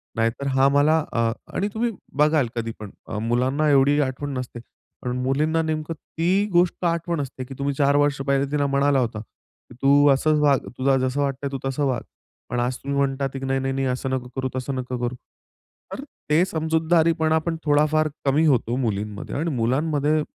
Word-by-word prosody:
नाहीतर 115 +5 -1
हा 135 +1 +5
मला 145 +3 +4 0.2
अ 115 -1 +1 0.2
आणि 200 - 0
तुम्ही 235 +1 0 0.3
बघाल 150 -3 +3
कधीपण 115 -3 -5 0.3
मुलांना 130 +6 +1
एवढी 140 +1 +4
आठवण 140 +1 -3
नसते. 125 -1 -6 0.4
पण 125 - -3
मुलींना 155 +5 +1
नेमकं 155 0 -2
ती 175 +5 -1
गोष्ट 175 +1 +2
आठवण 170 -1 0
असते 130 -1 -6
की 135 - -9
तुम्ही 140 0 -1
४ 140 0 +3
वर्ष 145 -1 +2
पहिले 140 0 +2
तिला 145 -1 +1
म्हणाला 140 0 +2
होता 115 -4 -2
की, 110 - -18
"तू 145 +1 +5
असंच 150 +3 +3
वाग, 140 -3 +4 0.2
तुला 135 +1 +2
जसं 130 +2 0
वाटतंय 140 0 -2
तू 135 - -3
तसं 135 +2 -1
वाग." 130 -3 0 0.5
पण 125 +1 -1
आज 125 +1 0
तुम्ही 140 0 -3
म्हणतात 135 0 0
आहे 135 - -4
की, 135 - -5
"नाही-नाही-नाही, 135 0 -1
असं 130 +1 -2
नको 130 -1 -2
करू, 130 -1 -2
तसं 130 +1 -3
नको 125 -1 -4
करू." 120 +1 -2 0.8
तर 275 - -6 0.3
ते 155 +3 +4
समजूतदारीपणा 160 -1 +1
आपण 165 +1 -1
थोडाफार 150 +1 +3 0.2
कमी 145 +4 +3
होतो 125 -5 +2
मुलींमध्ये 105 -4 -3
आणि 160 +4 -1
मुलांमध्ये 145 +5 +1
140 Hz, 175 wpm, -23 LUFS, 130-155 Hz, 0.8 s, हा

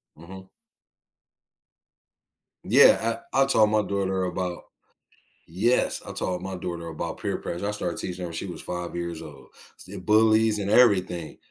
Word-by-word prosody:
Mhm. 95 +4 -12 2.2
Yeah, 115 0 +5
I 135 - +3
I - - +2
taught 110 -6 +4
my 105 0 +2
daughter 95 -2 -1
about 90 -1 -4 0.8
yes, 115 +9 +1
I - - -6
taught 90 -1 -3
my 95 0 -5
daughter 85 -2 -5
about 80 -2 -5
peer - - -2
pressure 95 +4 -4
I - - -1
started 90 -5 -4
teaching 90 0 -5
her - - -3
when - - -9
she 80 - -4
was 90 - -7
5 90 -1 -5
years 85 -2 -4
old, 70 -3 -12 0.3
s - - -14
the 100 +1 -9
bullies 110 +1 +3
and 100 0 -3
everything. 95 -8 +3
95 Hz, 160 wpm, -25 LUFS, 85-105 Hz, 2.2 s, Yeah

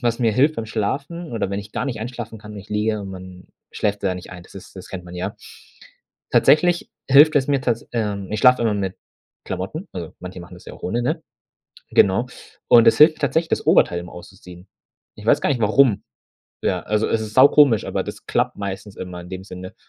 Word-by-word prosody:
was 120 0 0
mir 115 -3 +2
hilft 145 +7 +2
beim 115 -1 -4
Schlafen, 140 +10 -3
oder 110 -4 -2
wenn 100 - -2
ich 100 +1 -13
gar - - -2
nicht 120 -6 -4
einschlafen 115 -1 -6
kann 105 0 -11
und 105 - -8
ich 100 - -12
liege 105 0 0
und 100 -1 -7
man 90 -1 -11 0.3
schläft 105 -1 -2
da 95 -2 0
nicht 90 - -9
ein, 90 -1 -10
das - - -18
ist 95 - -12
das 95 - -10
kennt 90 -2 -7
man 90 0 -11
ja. 90 - -4 0.9
Tatsächlich 175 +3 +3 0.2
hilft 145 +3 +7
es 135 -1 +2
mir 140 -2 +2
tats 115 -3 -2
ähm, 105 -4 -2
ich 105 - -2
schlafe 125 -1 +5
immer 110 -2 +1
mit 95 -2 -3 0.5
Klamotten, 155 - -5
also, 85 -4 -7
manche 90 0 -8
machen 85 - -12
das - - -15
ja - - -9
auch - - -17
ohne, 120 +6 -1
ne? - - -2 0.7
Genau. 100 +6 +3 0.4
Und 115 -1 +7
das - - +5
hilft 155 +1 +6
tatsächlich, 160 +4 0
das - - -1
Oberteil 85 - +4
immer 85 0 -10
auszuziehen. 90 +1 -13 0.5
Ich 105 - -12
weiß 145 +6 +3
gar - - +1
nicht, 125 -5 0
warum. 110 +1 +3 0.6
Ja, - - -1
also, 105 +1 0
es 110 - 0
ist 110 0 -7
saukomisch, 135 -3 +6
aber - - -2
das - - -9
klappt - - 0
meistens 100 0 -6
immer 90 -1 -7
in 90 - -12
dem 95 0 -7
Sinne. 90 -1 -9
105 Hz, 220 wpm, -21 LUFS, 95-125 Hz, 0.9 s, hilft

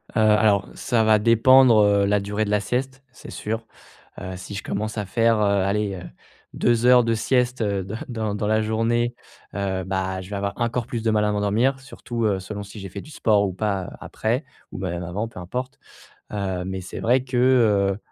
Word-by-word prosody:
Heu, - - +2
alors, 105 -2 +4
ça 115 -3 +1
va 110 -1 +4
dépendre, 115 +2 +6
heu, 100 -1 +3
la 105 +1 +2
durée 105 +2 -2
de 105 - -5
la 105 - +2
sieste, 130 +6 -3
c'est - - -13
sûr. 110 +2 -4 0.5
Heu, 95 0 -6
si 95 +2 -9
je - - -5
commence 110 +2 -3
à 105 - -2
faire, 115 +3 +2
heu, 100 -2 +2
allez, 100 0 -1
heu, 90 - -8 0.5
2 120 0 +1
heures 125 -1 +7
de 115 0 +1
sieste, 125 +2 0
heu, 100 -2 0
de 95 +4 -6
dans 110 -4 -3
dans 105 - -2
la 110 +1 +2
journée, 115 +2 0 0.4
heu, 95 -2 -2
bah, 95 0 -2
je 95 - -11
vais - - -3
avoir 100 0 -2
encore 120 0 -1
plus 115 -2 -4
de 110 - +2
mal 105 -1 +2
à 105 - +1
m'endormir, 110 +6 +1
surtout, 120 -3 -5
heu, 100 -3 +1
selon 100 +2 -6
si 100 +1 -11
j'ai 95 - -7
fait 100 +2 -7
du 155 - -14
sport 105 -7 +2
ou 95 - -4
pas, 100 -1 -1
heu, - - -8
après 120 +7 -2 0.3
ou - - -7
même 90 -2 -3
avant, 95 +6 -3
peu 110 - -11
importe. 125 +9 -5 0.5
Heu, 95 -3 -2
mais 95 0 -4
c'est 90 - -7
vrai 125 +2 +2
que, 125 -1 -4 0.6
heu, - - -13
105 Hz, 220 wpm, -23 LUFS, 100-115 Hz, 0.6 s, heures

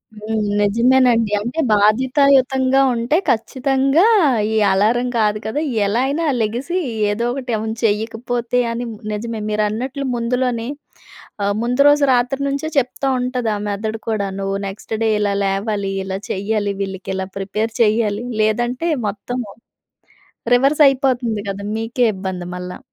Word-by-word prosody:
హ్మ్. 215 +1 -3 0.2
నిజమేనండి. 230 +1 +3
అంటే 240 +9 -4
బాధ్యతాయుతంగా 260 +4 +3
ఉంటే, 235 +6 +1
ఖచ్చితంగా 270 - +2 0.5
ఈ - - -1 0.2
అలారం 220 +6 +2
కాదు 210 -1 +1
కదా, 230 +7 -2 0.2
ఎలా 210 +5 +1
అయినా 305 +4 -1 0.2
లెగిసీ 245 +11 -2 0.3
ఏదో 225 +3 -1
ఒకటి 260 -2 -5
అవును. 220 +1 -3
చెయ్యకపోతే 230 +3 -1
అని, 235 +1 -3 0.3
నిజమే. 225 +1 -4
మీరన్నట్లు 220 +6 -2
ముందులోనే 240 0 -1 0.8
ఆహ్, 200 0 +1
ముందు 245 +3 0
రోజు 290 0 +5
రాత్రి 250 +2 +1
నుంచే 280 +2 -2
చెప్తా 275 +1 0
ఉంటది 250 -2 -2
ఆ - - -2
మెదడు 215 +2 -3
కూడా. 215 -3 0
నువ్వు 195 0 -2
నెక్స్ట్ 195 +3 -8
డే 225 - +2
ఇలా 205 -1 0
లేవాలి, 195 0 -1
ఇలా 190 0 -4
చెయ్యాలి. 205 +1 -1
వీళ్ళకిలా 190 -1 -4
ప్రిపేర్ 210 +3 -2
చెయ్యాలి. 215 -1 +1 0.2
లేదంటే, 240 +8 0 0.2
మొత్తము 215 +3 -4 1.1
రివర్సయిపోతంది 265 -4 +3
కదా! 195 0 -4
మీకే 225 +3 0
ఇబ్బంది 185 -2 -5
మళ్ళా. 180 0 -6
230 Hz, 125 wpm, -19 LUFS, 210-255 Hz, 1.1 s, రోజు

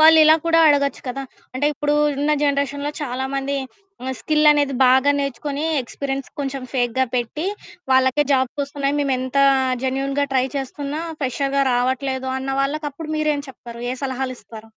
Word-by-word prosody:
వాళ్ళిలా 315 0 +8
కూడా 330 0 +4
అడగొచ్చు 280 -2 +2
కదా! 275 +2 -4 0.3
అంటే 285 +3 +1
ఇప్పుడు 295 +1 -1 0.3
ఉన్న 295 +1 +1
జనరేషన్‌లో 285 0 0
చాలా 260 -1 -3
మంది 275 +1 -1 0.5
ఆహ్, 260 - -2
స్కిల్ 305 -1 +2
అనేది 285 -2 +1
బాగా 260 +3 +5
నేర్చుకొని, 280 +2 -3 0.2
ఎక్స్పీరియన్స్ 270 +2 -4
కొంచెం 270 -1 -3
ఫేక్‌గా 255 0 +1
పెట్టి, 250 +8 -2 0.5
వాళ్ళకే 260 +2 +4
జాబ్స్ 260 +2 0
ఒస్తున్నాయి. 280 0 -2
మేము 280 -2 +1
ఎంత 260 +1 -4 0.5
జెన్యూన్‌గా 275 +2 0
ట్రై 260 0 +2
చేస్తున్నా 280 +3 -4 0.2
ఫ్రెషర్‌గా 275 +1 0
రావట్లేదు 260 +1 -1
అన్న 265 +1 -4
వాళ్ళకి 295 +2 -1
అప్పుడు 310 +2 -8
మీరేం 300 -2 0
చెప్తారు? 235 -2 -10
ఏ - - -3
సలహాలిస్తారు? 250 -5 -5
275 Hz, 145 wpm, -21 LUFS, 260-290 Hz, 0.5 s, వాళ్ళిలా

